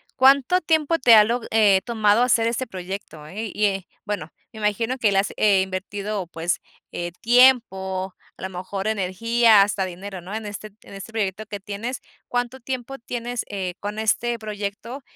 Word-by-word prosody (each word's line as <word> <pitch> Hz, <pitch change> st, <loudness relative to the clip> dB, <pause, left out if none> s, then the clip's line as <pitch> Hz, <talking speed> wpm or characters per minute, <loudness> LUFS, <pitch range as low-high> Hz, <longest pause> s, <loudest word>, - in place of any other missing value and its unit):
¿Cuánto 275 Hz, +7 st, +5 dB
tiempo 320 Hz, 0 st, +1 dB
te 240 Hz, -3 st, +7 dB
ha 210 Hz, -, +9 dB
lo 235 Hz, +3 st, -1 dB
eh, 205 Hz, -4 st, +4 dB
tomado 220 Hz, -1 st, +3 dB
hacer 230 Hz, -2 st, +3 dB
este 240 Hz, +2 st, -2 dB
proyecto, 185 Hz, -5 st, -7 dB
¿eh? 205 Hz, +7 st, -6 dB
Y, 210 Hz, -, +1 dB
eh, 195 Hz, -2 st, -1 dB, 0.2 s
bueno, 205 Hz, -7 st, -4 dB, 0.2 s
me 220 Hz, -, -11 dB
imagino 225 Hz, +4 st, 0 dB
que 220 Hz, -5 st, +2 dB
le 195 Hz, -, +1 dB
has, 195 Hz, -, +1 dB
eh, 200 Hz, -3 st, +4 dB
invertido, 195 Hz, +1 st, -4 dB
pues, 170 Hz, +1 st, -2 dB, 0.3 s
eh, 175 Hz, 0 st, -4 dB
tiempo, 210 Hz, -7 st, +3 dB, 0.2 s
a -, -, -14 dB
lo 190 Hz, -, -3 dB
mejor 190 Hz, +2 st, -5 dB
energía, 220 Hz, +2 st, +4 dB
hasta 200 Hz, -1 st, -1 dB
dinero, 185 Hz, +1 st, -7 dB
¿no? 195 Hz, +5 st, -7 dB
En 220 Hz, -1 st, -5 dB
este 205 Hz, +1 st, -6 dB, 0.2 s
en -, -, -14 dB
este 195 Hz, +3 st, -9 dB
proyecto 215 Hz, -1 st, -2 dB
que 205 Hz, -1 st, -6 dB
tienes, 210 Hz, +5 st, -5 dB, 0.3 s
¿Cuánto 245 Hz, +1 st, -2 dB
tiempo 260 Hz, +1 st, -5 dB
tienes, 240 Hz, +1 st, -4 dB
eh, 190 Hz, -3 st, -3 dB
con 205 Hz, +1 st, -5 dB
este 235 Hz, +2 st, +1 dB
proyecto 215 Hz, +4 st, -6 dB
210 Hz, 180 wpm, -23 LUFS, 195-235 Hz, 0.3 s, ha